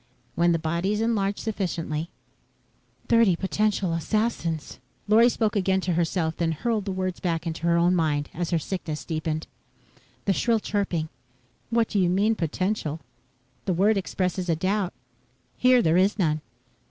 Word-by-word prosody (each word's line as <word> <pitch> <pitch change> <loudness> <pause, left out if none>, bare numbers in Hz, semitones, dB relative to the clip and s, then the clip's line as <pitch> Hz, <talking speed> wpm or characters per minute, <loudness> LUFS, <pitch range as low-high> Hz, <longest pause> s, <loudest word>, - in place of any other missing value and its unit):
When 170 +1 +3
the 165 - +3
bodies 170 +6 -1
enlarge 205 -3 0
sufficiently 170 -7 -3 0.5
..." - - -38
"Thirty 230 -6 +5
potential 195 -1 0
assassins...." 165 -3 -1 0.3
Lorry 225 +3 +6
spoke 220 -3 0
again 190 -1 +2
to 180 -1 -1
herself, 165 -1 0
then 165 -2 0
hurled 215 +5 -1
the 195 - -2
words 185 -1 -2
back 170 -2 -1
into 165 0 -3
her 170 0 +4
own 175 +1 +4
mind 150 -4 +1
as 175 0 -3
her 170 - +2
sickness 160 -2 -4
deepened. 155 -1 -2 0.8
The 195 - +3
shrill 230 +4 +2
chirping: 190 -7 -1 0.6
"What 230 -1 +2
do 205 - 0
you 180 -2 +3
mean, 200 +5 +3
potential? 170 -2 -2 0.7
The 185 - +1
word 200 +5 +3
expresses 185 -1 -2
a 165 - +3
doubt. 190 +3 -1 0.6
Here 250 -1 +4
there 165 0 +3
is 195 +4 +3
none." 155 -5 +1
185 Hz, 155 wpm, -25 LUFS, 165-210 Hz, 0.8 s, Lorry